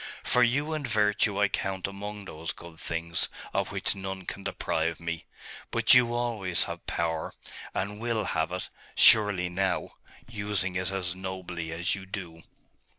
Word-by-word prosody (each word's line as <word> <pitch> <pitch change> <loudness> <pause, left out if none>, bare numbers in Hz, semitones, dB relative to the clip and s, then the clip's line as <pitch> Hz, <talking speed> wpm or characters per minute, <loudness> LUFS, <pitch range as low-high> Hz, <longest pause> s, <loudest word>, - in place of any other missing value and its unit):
For 125 - +3
you 140 +6 +3
and 150 -4 -2
virtue 105 -1 +2
I 105 - +5
count 95 -1 -2
among 100 +1 -5
those 80 -2 -5
good 85 -2 -12
things, 85 0 -1 0.2
of - - 0
which - - +1
none 95 -1 -5
can 100 - -6
deprive 80 -2 -1
me. 85 -1 -4 0.4
But - - +5
you 120 -1 +6
always 110 -8 +1
have - - -6
power, 80 -1 -1 0.4
and 105 +2 -2
will 115 -2 0
have 80 -3 0
it, 90 0 -4 0.3
surely, 105 -5 +6
now 90 0 0 0.4
using 105 -5 -1
it 95 +1 0
as 90 -2 -1
nobly 90 -3 -5
as 85 +1 0
you 95 -1 -5
do. 85 -4 -6
95 Hz, 155 wpm, -29 LUFS, 85-105 Hz, 0.4 s, you